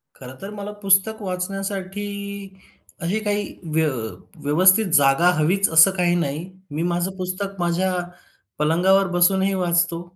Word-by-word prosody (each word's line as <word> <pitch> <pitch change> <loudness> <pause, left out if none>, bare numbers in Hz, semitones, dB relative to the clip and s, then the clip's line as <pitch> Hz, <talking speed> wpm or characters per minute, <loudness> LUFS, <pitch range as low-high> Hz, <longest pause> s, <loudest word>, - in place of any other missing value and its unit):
खरंतर 130 +9 -10
मला 205 0 -6
पुस्तक 195 +3 +2
वाचण्यासाठी 195 +1 -4 1.0
अशी 180 +6 -1
काही 205 0 -1 0.3
व्य 160 -1 +2 0.6
व्यवस्थित 185 +8 +4
जागा 145 +4 +4
हवीच, 180 +6 +2
असं 160 +4 +6
काही 175 -1 +2
नाही. 165 +1 -3 0.3
मी 155 - -2
माझं 175 +2 -1
पुस्तक 185 +2 -4
माझ्या 175 +2 0 0.7
पलंगावर 180 +6 +3
बसूनही 190 +2 +2
वाचतो. 170 -2 0
180 Hz, 120 wpm, -22 LUFS, 170-195 Hz, 1.0 s, असं